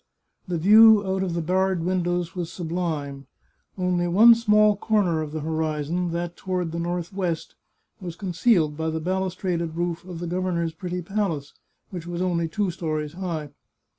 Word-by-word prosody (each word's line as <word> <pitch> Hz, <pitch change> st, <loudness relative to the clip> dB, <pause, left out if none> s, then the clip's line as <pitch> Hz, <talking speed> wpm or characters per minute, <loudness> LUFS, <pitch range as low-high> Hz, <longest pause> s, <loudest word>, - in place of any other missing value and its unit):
The 175 Hz, -2 st, -1 dB
view 215 Hz, +4 st, +7 dB
out 190 Hz, 0 st, -1 dB
of 180 Hz, -3 st, -2 dB
the 170 Hz, -, -1 dB
barred 185 Hz, 0 st, +1 dB
windows 175 Hz, -1 st, -1 dB
was 175 Hz, -2 st, -4 dB
sublime. 160 Hz, -6 st, -4 dB, 0.5 s
Only 180 Hz, -1 st, 0 dB
one 215 Hz, +7 st, +7 dB
small 210 Hz, -2 st, +4 dB
comer 195 Hz, -6 st, +1 dB
of 155 Hz, -1 st, -5 dB
the 155 Hz, 0 st, -4 dB
horizon, 160 Hz, +2 st, -2 dB
that 170 Hz, +1 st, -3 dB
toward 180 Hz, -3 st, -3 dB
the 170 Hz, -, -4 dB
northwest, 175 Hz, 0 st, -3 dB, 0.5 s
was 175 Hz, -3 st, -7 dB
concealed 175 Hz, -4 st, +1 dB
by 160 Hz, +1 st, -2 dB
the 160 Hz, 0 st, -2 dB
balustraded 180 Hz, -1 st, -2 dB
roof 170 Hz, -1 st, -2 dB
of 180 Hz, -1 st, -8 dB
the 175 Hz, -, -5 dB
governor's 170 Hz, -2 st, -1 dB
pretty 180 Hz, +2 st, -5 dB
palace, 170 Hz, -7 st, -2 dB, 0.4 s
which 175 Hz, -3 st, -7 dB
was 175 Hz, 0 st, -4 dB
only 175 Hz, -2 st, 0 dB
two 200 Hz, +2 st, -1 dB
stories 155 Hz, -3 st, -3 dB
high. 165 Hz, -5 st, -4 dB
175 Hz, 160 wpm, -24 LUFS, 165-185 Hz, 0.5 s, view